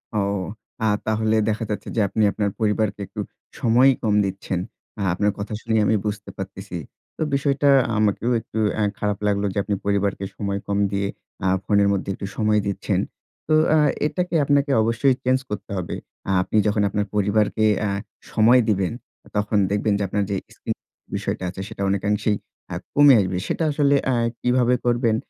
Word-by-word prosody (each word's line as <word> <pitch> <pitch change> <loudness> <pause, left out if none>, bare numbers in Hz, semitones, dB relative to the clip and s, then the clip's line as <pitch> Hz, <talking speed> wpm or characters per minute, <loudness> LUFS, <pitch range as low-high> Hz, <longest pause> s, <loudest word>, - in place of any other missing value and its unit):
ও, - - +2 0.7
আ - - +3 0.2
তাহলে 110 0 +1
দেখা 110 +2 -1
যাচ্ছে 105 -1 -4
যে 115 - +2
আপনি 110 +3 0
আপনার 105 0 -1
পরিবারকে 105 -1 0
একটু - - -5 0.4
সময়ই 125 +4 +5
কম 110 -2 +2
দিচ্ছেন। 95 -1 -3 0.4
আ - - -2
আপনার 105 +3 +1
কথা 100 +1 -4
শুনেই 110 -1 +1
আমি 110 - +3
বুঝতে 105 -1 -4
পারতেছি। - - -6 0.4
তো - - -7
বিষয়টা 140 0 +2 0.3
আমাকেও 105 +3 +1
একটু 110 - -6 0.2
অ্যা 110 - 0 0.2
খারাপ 105 -1 0
লাগলো 100 0 +1
যে - - -6
আপনি 105 - -1
পরিবারকে 100 -1 0
সময় 100 -1 -2
কম 100 - 0
দিয়ে 100 0 0 0.4
আ - - +3 0.2
ফোনের 100 -1 +3
মধ্যে 100 0 -2
একটু 100 - -6
সময় 105 -1 +3
দিচ্ছেন। 100 - -1 0.5
তো 155 - +2 0.2
আ - - +5 0.3
এটাকে 180 +2 -2
আপনাকে 140 0 +2
অবশ্যই 115 +4 +2
চেঞ্জ 130 +1 +3
করতে 105 - -6
হবে। 90 -2 -3 0.3
আ - - +2
আপনি 100 - -1
যখন 105 0 +1
আপনার 105 +1 -1
পরিবারকে 105 +1 +2 0.2
আ - - 0 0.4
সময় 120 +3 +5
দিবেন 95 -3 +1 0.5
তখন 105 +1 +1
দেখবেন 105 +1 +1
যে 100 - -1
আপনার 100 +2 0
যে - - +1 0.2
স্ক্রিন - - -4 0.4
বিষয়টা - - -3
আছে 95 +2 -7
সেটা 110 -2 -8
অনেকাংশেই 105 +2 +1 0.4
আ - - -2 0.2
কমে 145 -1 +7
আসবে। 95 -2 0
সেটা - - -1
আসলে 145 -1 +3 0.2
আ - - +2 0.3
কিভাবে 125 0 +3
করবেন 120 -2 +2
105 Hz, 175 wpm, -23 LUFS, 100-120 Hz, 0.7 s, কমে